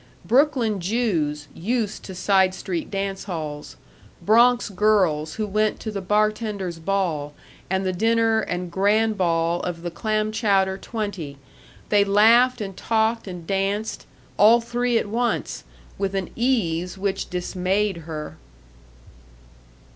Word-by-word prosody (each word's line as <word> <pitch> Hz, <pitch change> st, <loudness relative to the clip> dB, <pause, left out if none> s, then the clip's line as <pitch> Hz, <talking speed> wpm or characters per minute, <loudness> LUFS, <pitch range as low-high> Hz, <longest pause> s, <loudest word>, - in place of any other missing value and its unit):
Brooklyn 240 Hz, -, +2 dB
Jews 170 Hz, -8 st, -1 dB
used 220 Hz, +3 st, -2 dB
to 190 Hz, -, -8 dB
side 190 Hz, 0 st, +2 dB
street 175 Hz, -3 st, -4 dB
dance 195 Hz, -1 st, -3 dB
halls, 155 Hz, -6 st, -6 dB, 0.4 s
Bronx 240 Hz, +3 st, +4 dB
girls 185 Hz, -7 st, +1 dB
who 215 Hz, -, -2 dB
went 215 Hz, +1 st, 0 dB
to 220 Hz, -, -4 dB
the 200 Hz, -2 st, -4 dB
bartenders' 210 Hz, -3 st, -1 dB
ball, 160 Hz, -5 st, -1 dB, 0.3 s
and 190 Hz, +1 st, 0 dB
the 185 Hz, -, 0 dB
dinner 225 Hz, +3 st, +2 dB
and 180 Hz, -4 st, -3 dB
grand 210 Hz, +4 st, +2 dB
ball 170 Hz, -2 st, +1 dB
of 170 Hz, -1 st, -5 dB
the 175 Hz, -, -4 dB
Clamchowder 215 Hz, -1 st, 0 dB
Twenty, 195 Hz, -12 st, -5 dB, 0.5 s
they 205 Hz, -1 st, +5 dB
laughed 225 Hz, +5 st, +4 dB
and 195 Hz, -2 st, -5 dB
talked 225 Hz, +1 st, 0 dB
and 180 Hz, -3 st, -7 dB
danced 200 Hz, +3 st, -2 dB, 0.3 s
all 225 Hz, +3 st, +7 dB
three 240 Hz, 0 st, 0 dB
at -, -, 0 dB
once 230 Hz, +2 st, -2 dB, 0.3 s
with 195 Hz, 0 st, -1 dB
an 190 Hz, -2 st, -3 dB
ease 185 Hz, -8 st, 0 dB
which 195 Hz, 0 st, -2 dB
dismayed 185 Hz, +2 st, -1 dB
her. 155 Hz, -2 st, -7 dB
200 Hz, 125 wpm, -23 LUFS, 180-220 Hz, 0.5 s, all